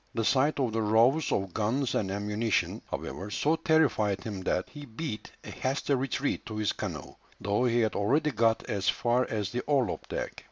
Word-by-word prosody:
The 115 -1 0
sight 140 +4 +3
of 125 -5 0
the 115 - 0
rows 115 +8 +3
of 95 -3 -1
guns 120 +5 0
and 95 - 0
ammunition, 105 +2 -1
however, 100 +3 -5
so 150 +9 +1
terrified 135 -12 +2
him 100 -4 -5
that 90 0 0
he 145 -1 -10
beat 120 0 -5
a - - -8
hasty 135 +2 -1
retreat 135 +1 -1
to 110 - -6
his 105 -1 +1
canoe, - - -5 0.3
though 105 +5 +1
he 120 -1 +3
had 110 -1 +1
already 140 +10 +2
got 115 -1 +2
as 100 -5 0
far 120 +1 +1
as 105 -3 -2
the 125 - -2
orlop 135 -9 0
deck. - - -3
115 Hz, 190 wpm, -29 LUFS, 105-135 Hz, 0.3 s, sight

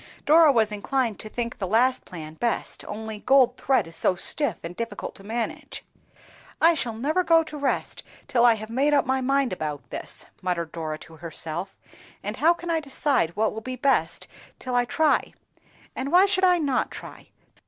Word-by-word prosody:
Dora 315 0 +7
was 220 -4 +2
inclined 225 +2 -1
to 215 - -7
think 235 +1 -4
the 190 - -2
last 245 +6 +2
plan 155 -3 -8
best, 235 +8 -2
only 220 0 -6
gold 255 0 +4
thread 265 -6 +1
is 165 0 -12
so 185 - +2
stiff, 285 +10 -1
and 170 +1 -6
difficult 230 -1 -5
to 195 - -14
manage. 225 +3 -4 0.7
"I 335 +1 +6
shall 240 -8 -2
never 305 +10 0
go 330 -1 +5
to 310 -1 -9
rest 285 -2 -2 0.3
till 255 -4 +2
I 235 -2 +6
have 220 +1 -7
made 280 +5 +2
up 280 - +3
my 265 0 0
mind 275 -2 +1
about 155 -5 -5
this," - - -6 0.2
muttered 170 -3 -2
Dora 155 -2 -4
to 160 +1 -14
herself, 165 +3 -4 0.5
"and - - -4
how 325 +3 +5
can 345 0 -3
I 325 - +2
decide 275 - 0
what 215 +1 +1
will 220 - -6
be 255 +3 -5
best 270 +2 +1 0.3
till 255 - -5
I 245 0 +3
try? 310 +5 +1 0.6
And 270 +2 -3
why 365 +2 +7
should 385 -2 +3
I 360 -1 +5
not 285 -6 0
try?" - - -10
245 Hz, 190 wpm, -25 LUFS, 205-285 Hz, 0.7 s, Dora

